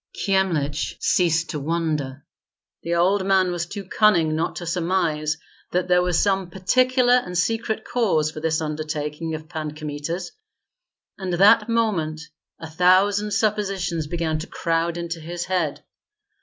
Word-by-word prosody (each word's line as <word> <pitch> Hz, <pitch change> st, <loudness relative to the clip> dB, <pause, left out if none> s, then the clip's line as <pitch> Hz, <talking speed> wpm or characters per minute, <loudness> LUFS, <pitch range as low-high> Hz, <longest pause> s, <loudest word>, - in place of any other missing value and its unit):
Kyemlich 170 Hz, -7 st, 0 dB
ceased 165 Hz, -2 st, +1 dB
to 150 Hz, -, -3 dB
wonder. 150 Hz, -3 st, -2 dB, 0.6 s
The 170 Hz, +1 st, -1 dB
old 190 Hz, +3 st, +2 dB
man 190 Hz, -1 st, +3 dB
was 175 Hz, -1 st, -3 dB
too 200 Hz, +2 st, -6 dB
cunning 180 Hz, -5 st, +3 dB
not 160 Hz, -, -1 dB
to 175 Hz, -, -6 dB
surmise 165 Hz, -3 st, 0 dB, 0.4 s
that 180 Hz, 0 st, 0 dB
there 180 Hz, 0 st, +5 dB
was 180 Hz, -2 st, +1 dB
some 195 Hz, -3 st, +1 dB
particular 250 Hz, +7 st, +2 dB
and 180 Hz, -8 st, +1 dB
secret 225 Hz, +4 st, -1 dB
cause 170 Hz, -11 st, +1 dB
for 155 Hz, -, -7 dB
this 160 Hz, 0 st, 0 dB
undertaking 155 Hz, +1 st, -3 dB
of 155 Hz, 0 st, -9 dB
Pan 155 Hz, -2 st, -5 dB
Kmita's, 155 Hz, +4 st, -5 dB, 0.9 s
and 185 Hz, -2 st, -3 dB
that 210 Hz, +5 st, +5 dB
moment 195 Hz, -10 st, 0 dB, 0.4 s
a 160 Hz, -, -7 dB
thousand 185 Hz, +5 st, +3 dB
suppositions 195 Hz, -6 st, -1 dB
began 160 Hz, -1 st, -1 dB
to 165 Hz, -, -6 dB
crowd 165 Hz, 0 st, -1 dB
into 170 Hz, -1 st, -4 dB
his 175 Hz, +2 st, -5 dB
head. 175 Hz, -6 st, -1 dB
175 Hz, 140 wpm, -23 LUFS, 155-190 Hz, 0.9 s, there